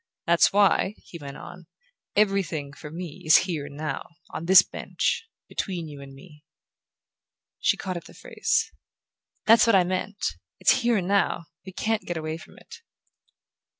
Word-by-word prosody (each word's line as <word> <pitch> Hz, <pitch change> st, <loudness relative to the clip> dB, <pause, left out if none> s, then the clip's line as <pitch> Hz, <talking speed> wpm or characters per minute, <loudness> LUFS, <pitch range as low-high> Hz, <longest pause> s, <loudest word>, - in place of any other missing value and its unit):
"That's 170 Hz, 0 st, +4 dB
why," 200 Hz, 0 st, +3 dB
he 170 Hz, -, -12 dB
went 140 Hz, -2 st, -8 dB
on, 175 Hz, -2 st, -11 dB, 0.5 s
"'everything,' 190 Hz, -9 st, +1 dB
for 150 Hz, -, -10 dB
me, 170 Hz, +1 st, -7 dB
is 160 Hz, -1 st, +7 dB
here 160 Hz, -6 st, -3 dB
and 145 Hz, 0 st, -11 dB
now: 155 Hz, -2 st, -4 dB, 0.2 s
on 165 Hz, -, -5 dB
this 185 Hz, 0 st, +9 dB
bench, 450 Hz, -, -2 dB, 0.2 s
between 175 Hz, -4 st, -4 dB
you 145 Hz, -2 st, -10 dB
and 135 Hz, -1 st, -11 dB
me." 150 Hz, +1 st, -16 dB, 1.2 s
She -, -, +2 dB
caught 185 Hz, -2 st, -4 dB
at 170 Hz, -, -9 dB
the -, -, -14 dB
phrase. 450 Hz, 0 st, -1 dB, 0.7 s
"That's 225 Hz, +1 st, +6 dB
what 230 Hz, -, +5 dB
I 185 Hz, -, +6 dB
meant: 185 Hz, +3 st, -3 dB, 0.2 s
it's 265 Hz, -, +4 dB
here 235 Hz, -1 st, +2 dB
and 180 Hz, -2 st, -2 dB
now; 195 Hz, -4 st, +1 dB, 0.2 s
we -, -, -6 dB
can't 220 Hz, +3 st, -1 dB
get 175 Hz, -, -2 dB
away 155 Hz, 0 st, -4 dB
from -, -, -15 dB
it." -, -, -13 dB
175 Hz, 165 wpm, -26 LUFS, 155-200 Hz, 1.2 s, this